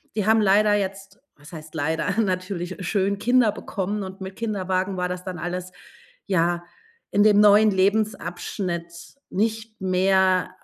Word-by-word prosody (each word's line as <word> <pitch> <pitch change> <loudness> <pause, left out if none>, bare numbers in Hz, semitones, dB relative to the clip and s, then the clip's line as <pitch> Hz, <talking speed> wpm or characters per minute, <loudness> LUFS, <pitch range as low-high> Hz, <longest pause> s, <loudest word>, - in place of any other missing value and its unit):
Die 210 -2 -1
haben 220 0 +5
leider 210 +1 +4
jetzt- 195 0 -4 0.2
was 150 +3 -16
heißt 155 -1 -10
leider, 160 +7 -1
natürlich 185 -2 -3
schön- 200 0 0
Kinder 245 0 +3
bekommen 205 -1 -4
und 190 +1 -9
mit 190 0 -7
Kinderwagen 190 -3 -2
war 180 0 -1
das 180 0 -5
dann 185 -3 -6
alles, 180 +1 -4 0.6
ja, 175 -2 +1 0.5
in 205 - +2
dem 210 -1 +5
neuen 210 +1 +6
Lebensabschnitt 185 -3 -2
nicht 220 +2 -2
mehr 185 0 +2
190 Hz, 140 wpm, -23 LUFS, 180-210 Hz, 0.6 s, neuen